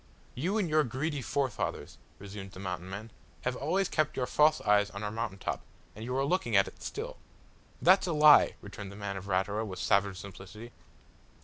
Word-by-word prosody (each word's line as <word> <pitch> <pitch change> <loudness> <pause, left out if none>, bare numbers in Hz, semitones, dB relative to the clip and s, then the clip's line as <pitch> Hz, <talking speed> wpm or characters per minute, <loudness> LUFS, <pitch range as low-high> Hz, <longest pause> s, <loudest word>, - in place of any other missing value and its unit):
"You 180 - -1
and 205 -5 +1
your 155 -1 +3
greedy 140 +4 -2
forefathers," 135 0 -2 0.2
resumed 100 -1 -9
the - - -10
Mountain 90 -1 -5
man, 105 +4 -7 0.3
"have 125 0 -1
always 180 +9 0
kept 155 -4 0
your 130 - +1
false 155 +4 +4
eyes 105 0 +3
on 100 0 -7
our 105 - -2
mountain 105 -3 -3
top, - - -3 0.3
and 110 - -8
you 125 +2 -2
are 135 - +2
looking 140 - 0
at 95 - +5
it - - -12
still." - - -5 0.7
"That's 185 +2 +6
a 170 - 0
lie," 150 -1 +7
returned 100 -1 -8
the - - -10
man 100 -1 -4
of 95 0 -7
Ratura 100 +3 0
with 95 -4 -6
savage 100 -1 +2
simplicity. 100 +4 -10
110 Hz, 195 wpm, -30 LUFS, 100-145 Hz, 0.7 s, lie